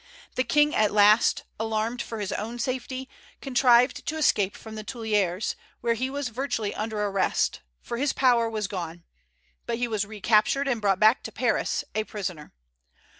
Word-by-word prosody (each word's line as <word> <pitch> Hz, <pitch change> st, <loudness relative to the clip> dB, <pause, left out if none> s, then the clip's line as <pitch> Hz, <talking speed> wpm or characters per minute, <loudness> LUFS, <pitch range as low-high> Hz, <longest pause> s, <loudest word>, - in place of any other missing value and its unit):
The 255 Hz, -, +1 dB
King, 295 Hz, +2 st, +3 dB
at 215 Hz, -1 st, +3 dB
last, 210 Hz, +2 st, +5 dB, 0.2 s
alarmed 225 Hz, +2 st, -1 dB
for 225 Hz, -2 st, -6 dB
his 205 Hz, -2 st, -3 dB
own 230 Hz, +3 st, -4 dB
safety, 260 Hz, +1 st, -3 dB, 0.3 s
contrived 250 Hz, -1 st, +3 dB
to 315 Hz, -, -2 dB
escape 205 Hz, -10 st, +2 dB
from 220 Hz, -, -10 dB
the 215 Hz, 0 st, -6 dB
Tuileries, 210 Hz, -4 st, -1 dB, 0.3 s
where 235 Hz, -1 st, +2 dB
he 255 Hz, +3 st, -2 dB
was 280 Hz, -1 st, -3 dB
virtually 230 Hz, -3 st, -2 dB
under 215 Hz, -1 st, -3 dB
arrest, 195 Hz, -2 st, 0 dB, 0.2 s
for 235 Hz, -, -4 dB
his 280 Hz, +2 st, +1 dB
power 240 Hz, -3 st, +3 dB
was 215 Hz, -2 st, -2 dB
gone; 175 Hz, -3 st, -6 dB, 0.6 s
but 230 Hz, -, -1 dB
he 245 Hz, 0 st, 0 dB
was 215 Hz, -3 st, -1 dB
recaptured, 215 Hz, +6 st, +2 dB
and 240 Hz, -5 st, 0 dB
brought 195 Hz, -2 st, +2 dB
back 220 Hz, +4 st, +5 dB
to -, -, -7 dB
Paris, -, -, 0 dB
a 215 Hz, -, 0 dB
prisoner. 180 Hz, -8 st, -6 dB
225 Hz, 170 wpm, -26 LUFS, 210-250 Hz, 0.6 s, last